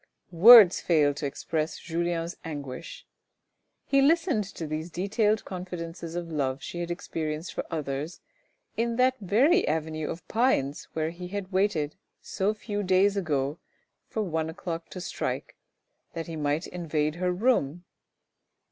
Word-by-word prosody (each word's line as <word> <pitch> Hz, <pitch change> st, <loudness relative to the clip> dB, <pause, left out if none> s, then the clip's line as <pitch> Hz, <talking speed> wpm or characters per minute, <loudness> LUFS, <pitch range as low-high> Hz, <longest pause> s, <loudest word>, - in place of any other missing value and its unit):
Words 205 Hz, +1 st, +9 dB
fail 150 Hz, -4 st, +3 dB
to 145 Hz, 0 st, -3 dB
express 155 Hz, +3 st, -3 dB
J 165 Hz, -, -11 dB
ulien's 170 Hz, 0 st, -1 dB
anguish. 145 Hz, -1 st, -7 dB, 0.8 s
He 275 Hz, 0 st, +3 dB
listened 305 Hz, -, +3 dB
to 185 Hz, -4 st, -7 dB
these 155 Hz, +2 st, -4 dB
detailed 210 Hz, +4 st, 0 dB
confidences 170 Hz, -2 st, -6 dB
of 175 Hz, -1 st, -3 dB
the -, -, -8 dB
love 135 Hz, -3 st, -1 dB
she 175 Hz, -, -6 dB
had 175 Hz, 0 st, -3 dB
experienced 160 Hz, -1 st, -4 dB
for -, -, -3 dB
others 150 Hz, 0 st, -4 dB, 0.6 s
in 235 Hz, 0 st, 0 dB
that 255 Hz, +1 st, +4 dB
very 260 Hz, -, +3 dB
avenue 155 Hz, -1 st, -2 dB
of 170 Hz, -, -7 dB
pines 210 Hz, -, +1 dB
where 160 Hz, 0 st, -1 dB
he 180 Hz, +1 st, -8 dB
had 195 Hz, 0 st, -5 dB
waited 185 Hz, -6 st, 0 dB, 0.2 s
so 195 Hz, +2 st, -1 dB
few 205 Hz, -1 st, -4 dB
days 190 Hz, +1 st, +3 dB
ago 150 Hz, -5 st, -1 dB, 0.5 s
for 220 Hz, -, -2 dB
one 160 Hz, -4 st, -2 dB
o'clock 165 Hz, -1 st, -5 dB
to 185 Hz, -, -7 dB
strike -, -, -4 dB, 0.6 s
that 165 Hz, -1 st, -4 dB
he 165 Hz, -, -6 dB
might 150 Hz, +2 st, -1 dB
invade 155 Hz, -4 st, -2 dB
her 180 Hz, 0 st, 0 dB
room. 180 Hz, -, +1 dB
170 Hz, 145 wpm, -27 LUFS, 155-200 Hz, 0.8 s, Words